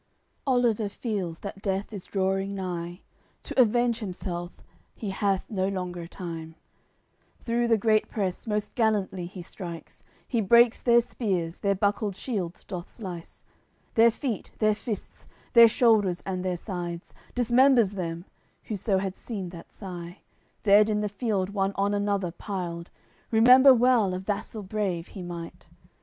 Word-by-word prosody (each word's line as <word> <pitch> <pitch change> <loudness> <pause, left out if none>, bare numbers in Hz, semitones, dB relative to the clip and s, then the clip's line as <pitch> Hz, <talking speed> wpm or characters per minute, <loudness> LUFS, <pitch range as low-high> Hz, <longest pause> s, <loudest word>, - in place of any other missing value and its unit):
AOI. - - -44
CXLVII - - -44
Oliver 230 -4 +2
feels 195 -7 -4
that 200 -1 -7
death 195 +1 -2
is 195 -3 -7
drawing 195 0 -1
nigh; 175 -1 -4 0.4
To - - +2
avenge 240 0 +2
himself 180 -3 -5 0.4
he 205 -3 -4
hath 195 0 0
no 190 -3 -1
longer 180 -3 -4
time; 165 -3 -7 0.9
Through 235 0 0
the 225 -1 +4
great 215 0 +2
press 195 -1 -3
most 210 -1 -2
gallantly 200 -6 0
he 180 0 -9
strikes, 170 -2 -9 0.3
He 235 -3 0
breaks 235 +3 +5
their 235 -1 +5
spears, 185 -8 -2
their 200 -1 +1
buckled 205 0 0
shields 190 -7 -4
doth 180 -3 -7
slice, 180 -7 -9 0.5
Their 230 0 +6
feet, 235 -1 -4
their 215 -1 +3
fists, 215 0 -6 0.3
their 235 -1 +10
shoulders 210 -7 +3
and 185 -1 -3
their 180 -1 -1
sides, 175 -2 -6 0.2
Dismembers 245 -2 +4
them: 170 -2 -4 0.4
whoso 200 -2 -1
had 190 0 -2
seen 195 -6 -6
that 170 -1 -11
sigh, 180 -2 -8 0.4
Dead 210 +1 +6
in 210 -1 +1
the 210 - -1
field 205 -3 -1
one 195 -1 0
on 200 +1 +1
another 200 -3 0
piled, 175 -2 -5 0.4
Remember 250 +4 +8
well 240 -6 +4
a - - -3
vassal 205 +2 -4
brave 190 -4 -2
he 190 - -8
might. 170 -1 -8
200 Hz, 150 wpm, -27 LUFS, 180-220 Hz, 0.9 s, their